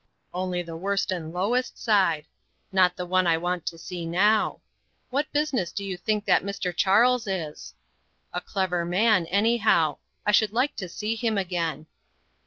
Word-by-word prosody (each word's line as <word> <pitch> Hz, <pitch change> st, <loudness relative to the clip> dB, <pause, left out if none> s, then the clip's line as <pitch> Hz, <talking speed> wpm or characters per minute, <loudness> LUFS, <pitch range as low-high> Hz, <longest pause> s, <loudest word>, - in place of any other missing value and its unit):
"Only 180 Hz, 0 st, -2 dB
the 165 Hz, -1 st, -8 dB
worst 195 Hz, +3 st, -1 dB
and 165 Hz, -4 st, -4 dB
lowest 220 Hz, +9 st, -1 dB
side; 185 Hz, -9 st, +2 dB, 0.5 s
not 185 Hz, -2 st, +4 dB
the 180 Hz, -, -4 dB
one 185 Hz, 0 st, +2 dB
I 165 Hz, -1 st, +4 dB
want 175 Hz, 0 st, -3 dB
to 165 Hz, -, -3 dB
see 175 Hz, +1 st, -6 dB
now. 200 Hz, +6 st, +2 dB, 0.5 s
What 285 Hz, +4 st, -1 dB
business 285 Hz, -, 0 dB
do 200 Hz, -, -4 dB
you 190 Hz, -2 st, -3 dB
think 210 Hz, +3 st, -1 dB
that -, -, +4 dB
Mr. 195 Hz, -3 st, -4 dB
Charles 230 Hz, +6 st, +3 dB
is? 170 Hz, -6 st, -5 dB, 0.6 s
A 180 Hz, -, -2 dB
clever 185 Hz, -3 st, -1 dB
man, 185 Hz, +1 st, +2 dB
anyhow; 200 Hz, -6 st, +2 dB, 0.3 s
I 210 Hz, -, +3 dB
should 210 Hz, 0 st, +3 dB
like 255 Hz, +5 st, +1 dB
to 185 Hz, -4 st, -5 dB
see 210 Hz, +5 st, -2 dB
him 225 Hz, -2 st, -1 dB
again." 170 Hz, -5 st, -2 dB
190 Hz, 165 wpm, -26 LUFS, 175-215 Hz, 0.6 s, not